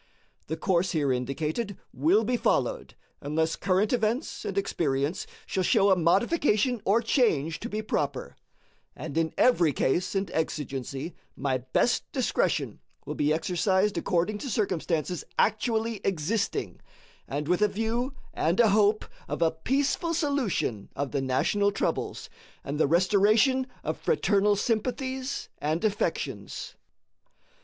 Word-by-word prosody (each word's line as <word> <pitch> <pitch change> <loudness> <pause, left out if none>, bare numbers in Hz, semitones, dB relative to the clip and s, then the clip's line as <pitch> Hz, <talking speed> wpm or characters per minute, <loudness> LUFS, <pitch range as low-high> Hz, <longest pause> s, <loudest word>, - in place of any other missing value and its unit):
The 160 - -3
course 185 0 +1
here 145 -5 +1
indicated 155 - -2 0.2
will 165 - +3
be 245 +3 0
followed - - 0 0.3
unless 160 +3 0
current 200 +4 +1
events 235 +3 -1
and 195 - -4
experience 150 -5 -1 0.2
shall 190 - -1
show 200 +1 +4
a - - +6
modification 215 - +2
or 225 +4 +3
change 165 - +1
to 235 - -5
be 215 +1 -3
proper, 145 -9 -2 0.6
and - - -7
in 165 -1 +1
every 175 -11 +4
case 180 +9 0
and 195 -2 -1
exigency 145 -1 -3 0.2
my 135 -1 -1
best 130 +1 0
discretion - - 0 0.3
will - - -4
be 150 +1 +1
exercised 190 +5 +1
according 185 +4 0
to 270 - -5
circumstances 180 -5 -1
actually 220 0 +1
existing, 195 - -1 0.5
and 145 +1 -3
with 180 +3 +1
a 210 - +5
view 230 +6 -2 0.2
and 170 +6 0
a 230 -2 +6
hope 210 +1 +3 0.2
of - - -1
a 160 - +3
peaceful 275 - 0
solution 265 - -1
of 140 -2 -3
the 140 - -1
national 200 +10 +1
troubles 200 - -2 0.4
and 145 +2 -4
the 155 - +4
restoration 210 - +3 0.2
of - - -3
fraternal 205 - +2
sympathies 255 +5 -2
and 155 +6 -1
affections. 205 -1 -2
195 Hz, 130 wpm, -27 LUFS, 160-225 Hz, 0.6 s, a